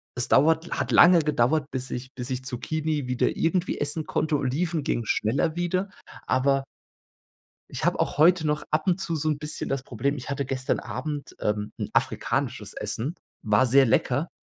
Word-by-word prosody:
es 120 - -1
dauert 160 +4 +4
la - - -4
hat - - -2
lange 175 0 +8
gedauert, 150 -1 +1
bis 130 0 -5
ich 130 +2 -6
bis 125 +1 -6
ich 130 0 -4
Zucchini 150 +3 -2
wieder 125 0 0
irgendwie 175 +2 0
essen 150 +2 -1
konnte. 155 -1 0
Oliven 155 +4 -1
ging 120 - -1
schneller 135 +10 0
wieder, 185 +3 -1 0.4
aber 135 +1 +2 1.1
ich - - -5
habe - - +1
auch - - -1
heute 165 +1 +5
noch 150 0 0
ab 155 +1 0
und 185 0 +2
zu 170 -3 -2
so 155 +1 -1
'n 150 - 0
bisschen 150 +1 -5
das 135 -2 -2
Problem 135 +3 -2
ich 135 0 -7
hatte 140 0 -1
gestern 130 0 -2
Abend, 145 -2 -5
ähm, 105 0 -1
'n - - -4
afrikanisches - - -1
Essen, 135 +9 -3 0.3
war 105 +5 +3
sehr 135 +2 +5
lecker. 145 +7 +1
145 Hz, 185 wpm, -26 LUFS, 130-160 Hz, 1.1 s, lange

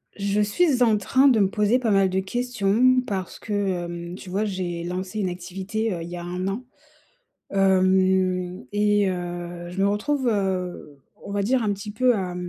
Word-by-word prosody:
Je 200 +1 0
suis 250 +5 +2
en 225 -3 +4
train 260 +7 +3
de 245 -5 +5
me 195 -2 +3
poser 210 +4 +2
pas 240 -3 -1
mal 195 -2 +4
de 190 +1 0
questions 245 +3 +2
parce 190 -3 -4
que, 220 - -9
hem, 175 -3 -2
tu 185 - -10
vois, 200 +4 0
j'ai 180 -4 -3
lancé 185 +4 -4
une 190 -3 0
activité, 190 +5 -3
heu, 170 -2 -5
il 170 - -8
y 175 - -6
a 175 - -6
1 180 +2 -3
an, 200 +6 -3 0.9
hem 185 -3 +2
et 205 -1 +3
heu, 175 -1 -5
je 180 - -6
me 200 - +4
retrouve, 255 +6 0
heu, 185 -8 -2 0.2
on - - -7
va 200 0 0
dire 250 +3 +1
un 210 - +1
petit 200 +1 -7
peu 250 +4 +3
à 185 -4 -3
195 Hz, 190 wpm, -24 LUFS, 180-210 Hz, 0.9 s, de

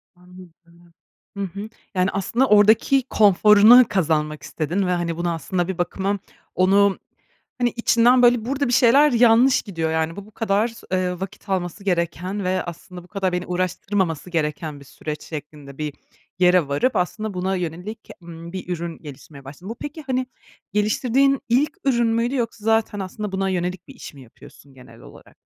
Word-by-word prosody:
Anladım. 175 -1 -18 0.4
Hı 200 - -2
hı. 200 +4 -6 0.3
Yani, 185 +1 +2
aslında 230 +7 0
oradaki 220 +5 +4
konforunu 210 +4 +6
kazanmak 155 -5 -1
istedin 180 +5 -2
ve, - - 0
hani, 170 -2 -2
buna 170 0 -1
aslında 175 +3 -2
bir 190 -2 -4
bakıma 195 +3 -2 0.4
onu, 195 +2 +3 0.6
hani, 245 -1 +1
içinden 235 +1 +3
böyle 240 -2 +4
burada 275 +2 -1
bir 240 - -1
şeyler 270 +4 +5
yanlış 240 +2 +4
gidiyor, 165 -6 -3
yani, 160 +1 -1
bu 200 - -9
bu 215 - -18
kadar 210 +1 0
s 230 0 -13
eee 180 -1 -1
,vakit 195 +1 -8
alması 185 +1 -3
gereken 180 +2 -2
ve 185 0 0
aslında 175 +1 -9
bu - - -18
kadar 190 -1 -2
beni 180 0 -3
uğraştırmaması 180 -2 -2
gereken 150 -2 -3
bir 140 - -15
süreç 150 +3 -7
şeklinde 150 -3 -9
bir 150 -2 -4 0.5
yere 180 -4 +4
varıp 145 - 0
aslında 215 +4 -2
buna 190 +1 -1
yönelik, 180 +6 -6
ımm, 170 0 -10
bir 185 -2 -6
ürün 170 -1 -4
gelişmeye 140 -1 -12
başladın. 150 +8 -10
Bu 230 - -5
peki, 295 +5 -8
hani, 255 -1 0 0.5
geliştirdiğin 250 +6 +2
ilk 290 +8 +1
ürün 240 -4 +2
müydü 230 +3 0
yoksa 230 -4 -3
zaten 225 -2 +1
aslında 195 +2 -5
buna 195 0 -1
yönelik 180 0 -3
bir - - -13
iş - - -10
mi 140 - -14
yapıyorsun 135 +3 -17
genel 125 -1 -16
olarak? - - -16
185 Hz, 170 wpm, -22 LUFS, 170-220 Hz, 0.6 s, konforunu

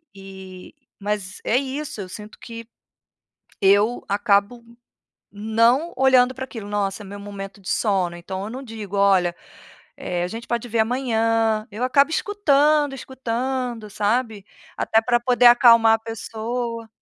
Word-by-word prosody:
e 190 -1 -12 0.3
mas 205 -1 -4
é 235 - +1
isso, 275 -2 -4
eu 190 - -7
sinto 210 +2 -11
que 230 -1 -9 1.0
eu 205 +4 +3
acabo 205 +3 +1 0.7
não 230 +9 +1
olhando 260 -1 +4
para 260 - -5
aquilo, 225 -5 -9
nossa, 205 0 -2
é - - -11
meu 200 +1 -9
momento 200 -1 -9
de 195 - -11
sono, 190 -5 0
então 190 +3 -6
eu 210 - -6
não 260 +3 -7
digo: 215 -5 -7
"Olha, 190 -3 +3 0.6
eh, 175 -1 -3
a 180 - -3
gente 230 +4 -8
pode 235 0 -2
ver 230 0 -2
amanhã." 225 -2 0
Eu 220 +4 -6
acabo 280 +3 +3
escutando, 300 -7 +2
escutando, 250 -3 -4
sabe? 215 0 -1 0.3
Até 225 - +2
para 240 +1 +2
poder 245 0 +3
acalmar 230 -2 +7
a - - 0
pessoa. 230 +1 -5
225 Hz, 145 wpm, -22 LUFS, 200-250 Hz, 1.0 s, acalmar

